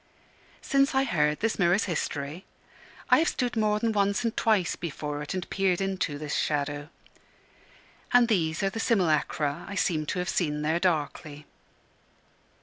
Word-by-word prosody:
Since 275 0 +2
I 265 - +4
heard 150 - +1
this 225 0 0
mirror's 180 +3 +3
history, 150 -1 -3 0.7
I - - +7
have 325 - +2
stood 245 -2 -1
more 215 -1 +2
than 230 +1 0
once 200 +1 +1
and 230 -1 -1
twice 210 -6 +2
before 150 -3 -5
it, 150 +5 -5
and 185 -1 -4
peered 190 -2 +1
into 190 -6 -2
this 150 0 -5
shadow. 145 0 -1 1.2
And 245 -1 +6
these 165 -6 0
are 195 - +1
the 225 - -5
simulacra 155 - +1
I 200 - -5
seem 155 -5 0
to - - -2
have 180 0 -2
seen 150 -5 -1
there 160 +3 +1
darkly. 150 -3 -2
180 Hz, 155 wpm, -27 LUFS, 150-210 Hz, 1.2 s, I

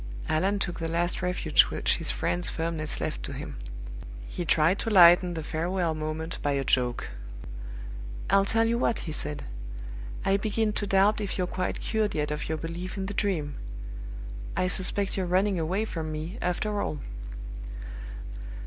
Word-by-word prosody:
Allan 190 +6 +2
took 175 -3 -2
the 165 - -1
last 175 +2 0
refuge 180 0 +5
which - - +1
his - - -2
friend's 90 0 +1
firmness 160 -2 -1
left - - -2
to 60 - -4
him: - - -6 0.7
he 175 - -3
tried 165 +3 +4
to 225 - -1
lighten 175 -2 +8
the 160 - -3
farewell 170 +2 0
moment 155 +1 -3
by 145 - +1
a 140 -1 +1
joke. 125 -2 +3 1.2
"I'll 195 0 +5
tell 225 +3 +3
you 235 +1 +2
what," 230 - +2
he 160 - -3
said, 150 -1 -3 0.8
"I 195 0 +4
begin 215 +1 +1
to 205 - -1
doubt 200 +2 +4
if 200 - -2
you're 180 - +2
quite 185 +1 -2
cured 215 -2 0
yet 150 0 0
of 150 0 -3
your 160 - 0
belief 170 +5 -5
in 190 - -1
the 205 - -3
Dream. 165 -9 0 1.0
I 185 - +3
suspect 190 +2 +1
you're 185 -2 0
running 185 +1 +3
away 185 +7 +1
from 160 -6 -3
me, 160 +8 -4
after 205 +4 0
all!" 150 - -1
180 Hz, 165 wpm, -28 LUFS, 155-195 Hz, 1.2 s, lighten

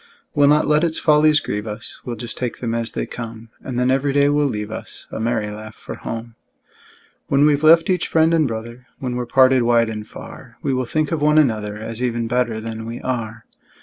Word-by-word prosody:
We'll 145 -1 +4
not 150 +1 +4
let 150 +2 +3
its 165 -2 0
follies 150 -1 +4
grieve 105 +1 -4
us, 105 +2 -7
We'll 120 - -4
just 115 0 -5
take 125 -2 -3
them 115 -2 -3
as 115 0 -2
they - - -2
come; 115 -1 -8
And 130 -2 -4
then 125 +1 +2
every 135 +1 +1
day 140 0 +4
will 145 0 +2
leave 105 -4 -4
us - - -8
A - - -5
merry 110 -2 -1
laugh 110 +1 -9
for - - -8
home. 115 0 -6 0.9
When 140 +1 +4
we've 145 -1 +3
left 165 +1 +6
each 180 -2 +1
friend 160 0 +3
and 160 -3 +3
brother, 115 +2 -7
When 125 -2 -4
we're 125 -1 -3
parted 130 0 +5
wide 115 -1 +3
and 105 0 -6
far, 120 +1 -11
We 140 -3 0
will 130 0 0
think 155 +5 -1
of 160 -3 -1
one 150 +1 +4
another, 110 -8 +2
As 110 +2 -6
even 120 -2 -1
better 120 -2 0
than 110 0 -6
we 115 +1 -5
are. 115 -3 -4
120 Hz, 220 wpm, -21 LUFS, 115-145 Hz, 0.9 s, left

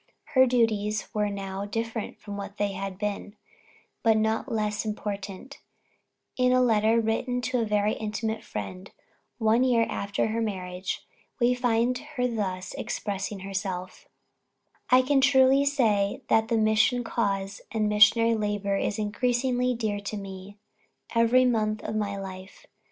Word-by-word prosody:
Her 260 -1 +6
duties 215 -3 +1
now 200 -2 -2
were 200 - -4
different 225 +1 -4
from 205 -1 -8
what 200 0 -7
they 205 0 0
had 195 -1 -5
been, 205 0 -4 0.7
but 225 -1 +4
not 220 +1 0
less 210 -1 -1
important; 205 +2 -5 0.8
and 250 - +4
in - - +4
a 255 - +4
letter 225 -2 +3
written 230 +3 -1
to 250 +1 -1
a 230 - +1
very 210 0 +1
intimate 220 +1 -3
friend 185 - -6 0.5
one 225 +2 +3
year 240 -3 +3
after 200 +2 -2
her 230 +1 -1
marriage, 185 -3 -4 0.3
we 245 0 +4
find 245 0 +1 0.2
her 250 0 +1
thus 190 -5 -3
expressing 200 -3 -4
herself: 190 -1 -5 0.8
"I 255 +1 +6
can 270 +1 +3
truly 265 +1 +5
say 220 -8 +1
that 220 0 +3
the 230 -1 +1
mission 220 +3 +3
cause, 200 -4 -2
and 220 -2 0
missionary 225 +2 +5
labor 205 -2 -1
is 200 - -1
increasingly 245 +3 0
dear 215 -3 -2
to 205 +1 -5
me, 195 0 -9 0.6
every 230 +2 +4
month 215 -3 0
of - - -4
my 205 -2 -1
life. 190 0 -9
215 Hz, 145 wpm, -27 LUFS, 200-235 Hz, 0.8 s, Her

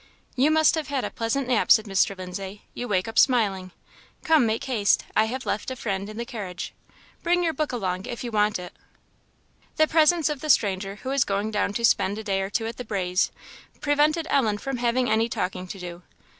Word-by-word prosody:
"You 270 +4 +3
must 315 0 +4
have 315 -3 -2
had 280 -3 -1
a - - -4
pleasant 240 +4 -1
nap," 250 -3 +2
said 220 - +6
Mr. 195 -1 +1
Lindsay; 190 +2 -7
"you 245 - -5
wake 190 -3 0
up 225 - +1
smiling. 200 -7 +2 0.5
Come 315 -7 +4
make 220 +4 -1
haste 230 -7 +2
I 215 - +4
have 260 +4 -4
left 210 - -2
a 260 - -4
friend 200 -4 -3
in 215 - -9
the 235 - -3
carriage. 195 -8 -6 0.5
Bring 355 +1 +2
your 330 -2 +1
book 305 0 -2
along 190 -6 -3
if 240 - -5
you 240 - -4
want 210 -1 +2
it." 180 -1 -9 1.0
The 310 - +4
presence 320 0 +4
of 300 -2 -2
the 310 - -6
stranger, 195 -5 +2
who 260 - -4
was 275 -1 +3
going 200 +2 -2
down 205 -1 0
to 235 +2 +1
spend 200 -2 +2
a 220 - -5
day 195 -2 0
or 195 - -3
two 225 +2 -1
at 225 0 -5
"the 250 - -5
Braes," 185 -4 0 0.5
prevented 300 +2 +2
Ellen 220 -7 +2
from 270 +4 -4
having 245 +1 +1
any 220 +1 +2
talking 185 -3 -3
to 195 - -7
do. 175 -1 -8
225 Hz, 215 wpm, -25 LUFS, 195-265 Hz, 1.0 s, said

